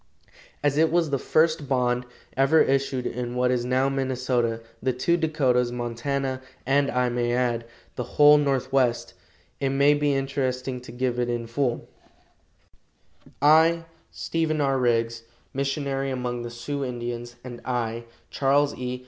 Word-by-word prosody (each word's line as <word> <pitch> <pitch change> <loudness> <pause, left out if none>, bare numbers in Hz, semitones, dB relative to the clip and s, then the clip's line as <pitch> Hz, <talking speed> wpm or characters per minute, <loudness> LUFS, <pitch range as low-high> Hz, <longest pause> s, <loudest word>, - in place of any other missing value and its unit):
As 145 0 +2
it 160 0 +4
was 165 -3 +1
the 140 - +1
first 155 -1 +1
bond 125 -2 +1 0.3
ever 135 +4 +4
issued 135 -2 +1
in 120 0 -4
what 125 0 +2
is 125 -1 0
now 130 +2 +2
Minnesota, 130 -4 0 0.2
the 130 +2 0
two 130 +8 +1
Dakotas, 135 -7 +1
Montana, 130 +3 -3 0.2
and, 140 +2 +2
I 125 0 +1
may 120 0 0
add, 120 -2 0 0.3
the 125 - -3
whole 150 0 +8
Northwest; 135 -3 0 0.5
it 135 - 0
may 140 +2 +4
be 145 -1 +1
interesting 130 -2 -2
to 125 - -11
give 125 0 -2
it 120 0 0
in 120 -1 -2
full: 120 +1 -2 1.6
"I, 160 +3 +5 0.3
STEPHEN 160 -2 -2
R. 135 -2 +1
RIGGS, 115 -1 +1 0.3
Missionary 135 0 -1
among 125 -2 -3
the 120 - -5
Sioux 135 +5 -4
Indians, 120 -1 -5
and 120 -2 -8
I, 115 -2 -2 0.3
CHARLES 140 +1 +2
E. 125 0 -4
130 Hz, 145 wpm, -25 LUFS, 120-140 Hz, 1.6 s, whole